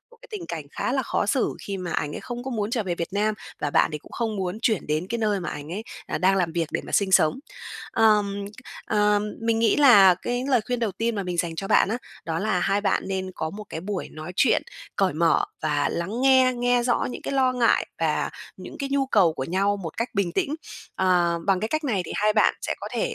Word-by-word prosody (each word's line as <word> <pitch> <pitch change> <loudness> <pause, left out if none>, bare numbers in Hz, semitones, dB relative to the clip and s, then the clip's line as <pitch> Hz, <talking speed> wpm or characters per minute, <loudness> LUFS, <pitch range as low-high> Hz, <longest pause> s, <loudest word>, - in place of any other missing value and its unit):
một 475 - -19
cái - - -14
tình 405 -6 -6
cảnh 160 -3 -5
khá - - -2
là 270 0 +1
khó 225 - -1
xử, 255 +4 +1
khi 200 - -3
mà 180 -2 -4
ảnh 145 0 -1
ấy - - -5
không 240 0 -6
có 265 - -4
muốn 215 -3 -2
trở 235 -2 0
về 185 -3 -2
Việt 170 0 -3
Nam, 210 +1 +1 0.3
và 145 - -1
bạn - - +3
thì 150 - -3
cũng - - -18
không 225 -3 -2
muốn 190 +1 -3
chuyển 220 -6 +1
đến 155 +4 -1
cái 235 - -2
nơi 210 -3 0
mà 170 - -4
ảnh 150 +2 -7
ấy, 205 +4 -4 0.2
à, - - -2
đang 190 +3 +3
làm 175 -4 0
việc 165 -2 -1
để - - 0
mà - - -8
sinh 195 -2 +2
sống. 155 +5 +4 0.5
Ờm, 205 -2 +3 0.4
ờ, 210 -1 +3 0.2
mình 230 0 +1
nghĩ 225 -2 +3
là 205 -10 +8
cái 245 +7 -3
lời 255 -4 +4
khuyên 245 -1 -1
đầu 220 -4 0
tiên 230 +5 -1
mà 200 - -2
mình 180 -2 -4
dành 170 -1 -1
cho 195 +4 -5
bạn - - +4
á, 225 - -1 0.3
đó 160 0 -2
là 195 -1 0
hai 195 +3 +1
bạn 205 - +1
nên 190 -1 -3
có 160 - -3
một 210 +4 -8
cái 160 - -5
buổi 190 +1 -4
nói 155 +3 -8
chuyện - - +3 0.3
cởi 195 -4 +2
mở 165 +1 +3 0.2
và 145 -2 +1
lắng 195 +8 -3
nghe, 260 -1 +5
nghe 245 0 +2
rõ 240 0 +1
những - - -7
cái - - -3
lo 260 -2 +3
ngại 245 -2 +2
và - - 0 0.3
những - - -10
cái 280 -2 -3
nhu 275 -1 +2
cầu 195 -10 +4
của 130 - -4
nhau 195 +6 +1
một 170 -6 -7
cách 230 +2 -1
bình 195 -4 0
tĩnh. 280 - 0 0.4
Ờ, 175 -2 +2
bằng 195 -2 +3
cái 220 - -2
cách 310 +4 -2
này 215 -9 0
thì - - -6
hai 210 +1 +3
bạn 215 - +4
sẽ - - -1
có - - -5
thể - - -1
205 Hz, 260 wpm, -25 LUFS, 175-235 Hz, 0.5 s, là